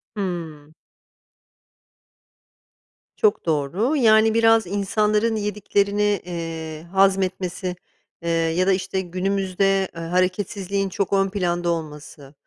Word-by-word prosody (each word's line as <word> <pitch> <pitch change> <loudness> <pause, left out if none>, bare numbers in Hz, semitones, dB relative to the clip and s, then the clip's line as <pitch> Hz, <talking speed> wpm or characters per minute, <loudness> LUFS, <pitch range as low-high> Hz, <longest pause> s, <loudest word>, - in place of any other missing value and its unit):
Hımm. 165 -6 -5 2.4
Çok 430 -2 +2
doğru. 170 - 0
Yani, 220 -4 +5
biraz 225 -2 +4
insanların 210 +3 +1
yediklerini, 205 -1 0
eee, 165 -2 -6
hazmetmesi, 185 -2 +1 0.5
eee, 170 - -3
ya 165 +2 +1
da, 195 - +5
işte, 190 0 -2
günümüzde, 195 +1 0
eee, 165 - -6
hareketsizliğin 185 +3 -1
çok 200 +1 -2
ön 195 0 +2
planda 175 -3 -1
olması. 150 -4 -6
190 Hz, 95 wpm, -22 LUFS, 170-205 Hz, 2.4 s, Yani